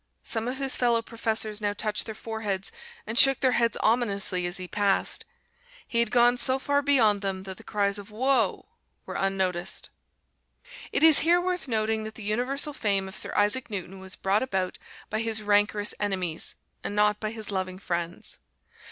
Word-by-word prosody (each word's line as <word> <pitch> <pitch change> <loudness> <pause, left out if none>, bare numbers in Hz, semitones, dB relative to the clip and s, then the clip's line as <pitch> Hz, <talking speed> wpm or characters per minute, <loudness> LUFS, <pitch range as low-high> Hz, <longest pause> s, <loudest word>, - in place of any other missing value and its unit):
Some 225 -1 -1
of 255 +1 -3
his 270 -1 0
fellow 235 -2 +2
professors 220 -2 -2
now 205 -1 0
touched 210 +1 -1
their 220 - -6
foreheads 210 -4 -3 0.3
and 220 +2 0
shook 270 -1 +7
their 260 -2 +3
heads 235 -2 +1
ominously 200 -6 +1
as 175 - -2
he 185 -1 -5
passed. 200 0 +1 0.6
He 235 - 0
had 235 -2 +2
gone 240 +1 +4
so 260 +2 +2
far 285 +1 0
beyond 235 -8 +3
them 190 -1 -3
that 190 -1 -7
the - - -14
cries 205 -1 0
of 200 +1 -11
"whoa!" 230 -1 +1 0.4
were - - -7
unnoticed. 190 -2 -1 1.0
It - - 0
is 320 -2 +9
here 340 +3 +4
worth 360 -4 -2
noting 220 -2 0
that 220 0 -8
the 220 - -9
universal 250 +8 0
fame 200 -6 +1
of 190 - -8
Sir - - -2
Isaac 210 +6 +2
Newton 190 -2 -6
was 190 0 -5
brought 195 +2 +1
about 190 -8 -2 0.3
by 215 - -1
his 220 -1 0
rancorous 205 0 +2
enemies, 185 -5 -1 0.3
and 205 - -4
not 210 0 +3
by 215 - -3
his 220 -1 -3
loving 185 -1 -3
friends. 175 -2 -4
215 Hz, 180 wpm, -26 LUFS, 195-240 Hz, 1.0 s, is